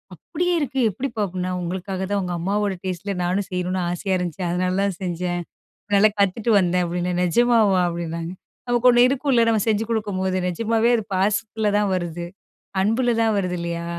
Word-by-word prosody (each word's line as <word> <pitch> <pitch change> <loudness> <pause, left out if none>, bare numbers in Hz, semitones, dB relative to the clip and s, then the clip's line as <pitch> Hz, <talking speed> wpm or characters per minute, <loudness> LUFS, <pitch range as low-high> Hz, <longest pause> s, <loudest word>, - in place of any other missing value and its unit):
"அப்படியே 355 - -2
இருக்கு, 270 -3 -2
எப்டிப்பா?" 230 0 -3
அப்படின்னா. 185 0 -3
"உங்களுக்காக 185 +2 -4
தான், 200 - +1
உங்க 180 - -3
அம்மாவோட 200 +2 0
டேஸ்ட்ல, 185 +2 -3
நானும் 185 +3 -1
செய்யணுனு 180 0 -1
ஆசையா 185 +2 -1
இருந்துச்சு. 180 +1 -4
அதனால 185 +1 0
தான் 200 -3 -1
செஞ்சேன். 175 0 -2 0.6
நல்லா 215 +1 +5
கத்துட்டு 205 +4 +1
வந்தேன்" 180 -1 +1
அப்படின்னேன். 180 +1 -2
"நெஜமாவா?" 215 -1 +3
அப்படின்னாங்க. 170 0 -4 0.4
நமக்கு 245 +1 +3
ஒண்ணு 240 0 +6
இருக்கும்ல. 265 -3 +2
நம்ம 220 -2 +2
செஞ்சு 215 0 +1
குடுக்கும்போது, 190 -4 -1
நெஜமாவே 225 +5 +1
அது, 220 - -4
பாசத்துல 210 +2 0
தான் 205 -2 +1
வருது. 175 -1 -4 0.6
அன்புல 235 +4 +2
தான் 220 - +2
வருது. 180 -2 -1
இல்லையா? 170 0 -3
190 Hz, 160 wpm, -22 LUFS, 180-220 Hz, 0.6 s, ஒண்ணு